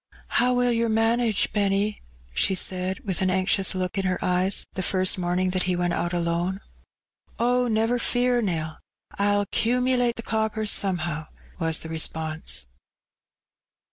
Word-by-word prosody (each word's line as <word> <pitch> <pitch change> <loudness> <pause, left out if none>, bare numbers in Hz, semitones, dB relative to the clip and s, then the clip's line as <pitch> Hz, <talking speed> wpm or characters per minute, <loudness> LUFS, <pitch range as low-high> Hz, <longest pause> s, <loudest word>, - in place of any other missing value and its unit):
''How 250 +1 +3
will 245 0 +2
yer 230 0 +1
manage, 225 -1 +1
Benny?'' 200 0 0 0.3
she 190 - +2
said, 185 +1 -1
with 190 -3 -1
an 185 - +2
anxious 190 +1 +2
look 185 +1 -2
in 190 - -2
her 185 -1 0
eyes, 180 +2 +1
the 190 - -3
first 185 0 +2
morning 180 +1 0
that 185 0 0
he 180 - +1
went 175 0 0
out 175 +1 -1
alone. 175 +2 -1 0.8
"Oh, 245 +1 +2
never 225 +2 +1
fear, 245 0 +1
Nell, 160 -6 -3 0.4
I'll 205 0 +2
'cumulate 245 +2 +1
the 230 - -7
coppers 220 -1 0
some 190 -3 +2
how," 155 -2 -4 0.3
was 165 -2 +1
the 160 - -7
response. 160 - -1
195 Hz, 150 wpm, -25 LUFS, 180-230 Hz, 0.8 s, How